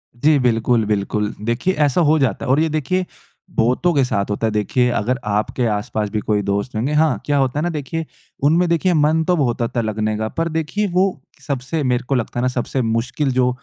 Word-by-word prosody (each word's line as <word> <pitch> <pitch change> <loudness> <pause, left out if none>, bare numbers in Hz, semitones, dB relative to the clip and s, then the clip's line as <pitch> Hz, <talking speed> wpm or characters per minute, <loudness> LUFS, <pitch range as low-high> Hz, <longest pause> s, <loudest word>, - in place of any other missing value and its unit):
जी। 145 +5 +3
बिल्कुल, 115 -2 +2
बिल्कुल। 105 0 -1
देखिए 120 - 0
ऐसा 145 +5 +2
हो 155 - +4
जाता 135 -4 0
है - - 0
और 135 - +4
ये 160 0 +2
देखिए 155 +5 -1 0.5
बहुतों 125 +10 +2
के 140 -3 +3
साथ 105 -6 -1
होता 105 +2 -1
है। - - -1
देखिए 110 +4 +1
अगर 125 +5 -1
आपके 105 +4 0
आसपास 105 0 -2
भी 105 - -2
कोई 105 0 0
दोस्त 100 +4 -2
होंगे 125 +7 -1
हाँ 155 -9 +2
क्या 145 -1 +1
होता 135 +1 +1
है - - -1
ना 175 - 0
देखिए 160 +1 -4 0.4
उनमें 165 +5 +4
देखिए 170 +2 +2
मन 155 +1 +3
तो 180 - +3
बहुत 125 -5 0
होता 120 +1 -1
लगने 110 -1 -1
का। 110 0 -2
पर 165 0 0
देखिए 160 +6 -1
वो 180 +2 +3 0.4
सबसे 140 +2 -2
मेरे 125 -1 +1
को 135 - +2
लगता 120 0 -2
है - - 0
ना 125 - +2
सबसे 130 +1 -1
मुश्किल 120 +5 -1
जो 125 0 +2
125 Hz, 220 wpm, -20 LUFS, 110-155 Hz, 0.5 s, हो